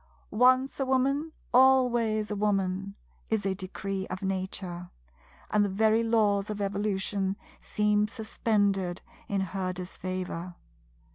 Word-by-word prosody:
"Once 255 +5 +3
a 270 - +1
Woman, 275 +4 +1 0.2
always 240 -4 +4
a - - -1
Woman" 195 -1 -1 0.3
is 220 -3 0
a 195 - +1
Decree 190 +1 -4
of 185 +1 -6
Nature; 185 -2 -3 0.6
and 210 -1 +4
the 205 - 0
very 220 +3 +3
Laws 215 -3 +2
of 210 -1 -4
Evolution 200 -1 -1 0.3
seem 210 0 +1
suspended 205 -5 0 0.2
in 200 -1 0
her 190 0 -2
disfavour. 180 -1 -5
200 Hz, 120 wpm, -28 LUFS, 190-220 Hz, 0.6 s, always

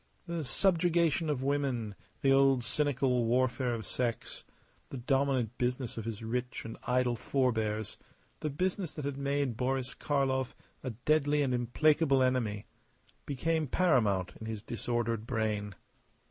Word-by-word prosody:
The 170 -2 -3
subjugation 170 +1 +2
of 135 -3 -1
women, 135 -6 0 0.3
the 135 - +4
old 135 -2 +4
cynical 130 -1 +1
warfare 125 0 +1
of 110 -3 -6
sex 120 -1 -3 0.5
the 135 - -6
dominant 130 -2 +1
business 125 0 -1
of 115 - -5
his 115 -1 -5
rich 125 +2 -3
and 115 - -6
idle 125 -1 +2
forbears, 110 -4 -1 0.4
the 155 - -2
business 180 +3 -2
that 150 - -5
had 140 -1 -3
made 140 -3 0
Boris 130 +1 -1
Karlov 130 -2 0 0.3
a 130 - -2
deadly 145 +5 +2
and 130 -2 0
implacable 140 +3 +3
enemy 115 -5 0 0.6
became 160 +3 0
paramount 110 - +2
in 110 - -7
his 110 -2 -5
disordered 115 -1 -2
brain. 105 -4 -1
130 Hz, 135 wpm, -31 LUFS, 115-140 Hz, 0.6 s, the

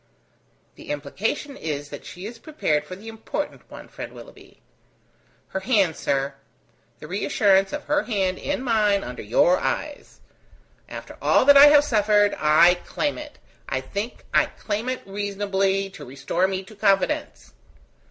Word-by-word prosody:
"The - - -13
implication 195 - -3
is, 145 - -5
that 145 - -9
she 180 +2 -9
is 230 +2 -8
prepared 155 - -1
for 185 - -8
the 205 +4 -13
important 225 +6 -6
one, - - -11
friend - - -9
Willoughby." - - -14 0.9
"Her 190 - -3
hand, 190 - +2
sir; 135 +1 -1 0.7
the 150 - -10
reassurance 195 +1 +2
of 295 - -4
her 295 0 +1
hand 190 -7 -1
in 285 -2 -3
mine 210 -5 +2
under 125 0 -7
your 170 - +3
eyes: 295 -1 -4 0.7
after - - -9
all - - +3
that 285 +1 +8
I 280 +1 +10
have 290 0 +7
suffered, 210 -5 +3
I 165 +4 +5
claim 295 0 -2
it, 300 -1 -10 0.3
I - - -1
think 210 +4 -6
I - - +4
claim 215 +3 -4
it 255 - -4
reasonably, 195 -1 -1
to 195 - -11
restore 135 +8 -1
me 190 0 -3
to 215 +3 -15
confidence." 195 - 0
200 Hz, 150 wpm, -23 LUFS, 180-230 Hz, 0.9 s, I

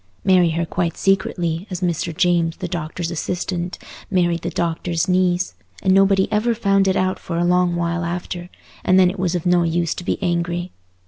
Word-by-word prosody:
Marry 180 -2 +4
her 165 +1 -1
quite 170 0 -2
secretly, 180 -2 0
as 180 -1 -5
Mr. 175 -1 -1
James, 170 0 +1
the 185 - -4
doctor's 170 0 -4
assistant, 175 +1 -3 0.3
married 175 -3 +1
the 170 - -3
doctor's 170 -1 -1
niece, 180 -1 +1 0.3
and 190 - +4
nobody 195 0 +4
ever 225 +2 +1
found 195 -3 +2
it 190 - +2
out 185 0 0
for 170 - -4
a 170 - +1
long 180 0 +2
while 170 0 -1
after, 175 +1 -4 0.3
and 185 +1 +4
then 180 -1 +5
it 195 - -9
was 180 -1 0
of 175 - -3
no 175 0 +4
use 170 0 0
to - - -7
be - - -1
angry. 175 -1 -1
175 Hz, 190 wpm, -21 LUFS, 170-185 Hz, 0.3 s, then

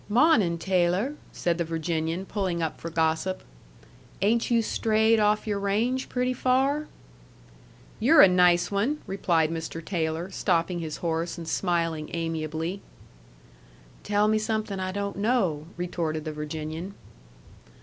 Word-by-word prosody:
"Mawnin', 215 - +4
Taylor," 185 - +1 0.2
said 170 -1 -1
the - - +2
Virginian, 165 +2 -2
pulling 190 -4 -2
up 160 -2 -3
for 165 - -4
gossip. 160 +3 0 0.8
"Ain't 230 +3 +2
you 230 -2 +3
strayed 220 +1 +2
off 210 0 +2
your 205 -2 -1
range 225 +6 0
pretty 250 0 0
far?" 270 +4 +1 1.1
"You're 290 +8 +6
a - - +9
nice 180 -1 +4
one!" 230 +10 0
replied 170 -5 +1
Mr. 165 0 -4
Taylor, 165 0 -2
stopping 175 -2 0
his 160 -2 -5
horse 165 +1 -1
and 165 -1 -7
smiling 165 -4 -1
amiably. 165 +2 -3 1.2
"Tell 205 0 +2
me 215 0 +2
something 215 -2 -2
I 185 0 -2
don't 200 0 -3
know," 200 -9 0
retorted 165 -3 -3
the 155 - -4
Virginian. 155 +5 -5
180 Hz, 130 wpm, -26 LUFS, 165-215 Hz, 1.2 s, a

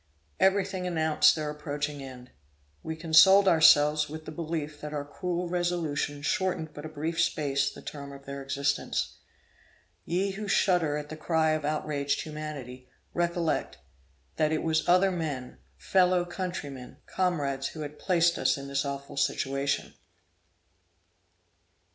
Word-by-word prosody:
Every 195 0 +4
thing 185 -2 -4
announced 160 -3 +4
their 155 -2 -3
approaching 145 -1 -4
end. 130 -2 -10 0.5
We 160 - -5
consoled 175 +5 +6
ourselves 150 -3 +5
with 155 +1 -8
the - - -7
belief 155 -2 -4
that 150 0 -6
our 145 -1 -3
cruel 175 +4 -3
resolution 170 -5 -1
shortened 180 -3 -1
but 150 +1 -7
a - - -9
brief 160 +2 -2
space 140 -4 +1
the - - -12
term 140 -1 -7
of 140 0 -12
their 140 0 -6
existence. 135 +1 -1 0.9
Ye 190 +4 0
who 205 +2 -6
shudder 175 -7 +2
at 150 0 -6
the 155 - -6
cry 160 0 +1
of 155 -1 -1
outraged 145 -2 -1
humanity, 145 -5 -7 0.2
recollect, 170 -1 -1 0.6
that 155 -1 +2
it 155 - 0
was 160 +1 0
other 185 +2 +5
men, 150 -8 -4 0.2
fellow 180 -1 +3
countrymen, 175 -8 -6
comrades 145 -7 -1
who 155 - -8
had 150 0 -7
placed 170 -2 +2
us - - +2
in 140 0 -7
this 140 0 0
awful 140 0 -6
situation! 140 0 -1
155 Hz, 140 wpm, -28 LUFS, 145-175 Hz, 0.9 s, consoled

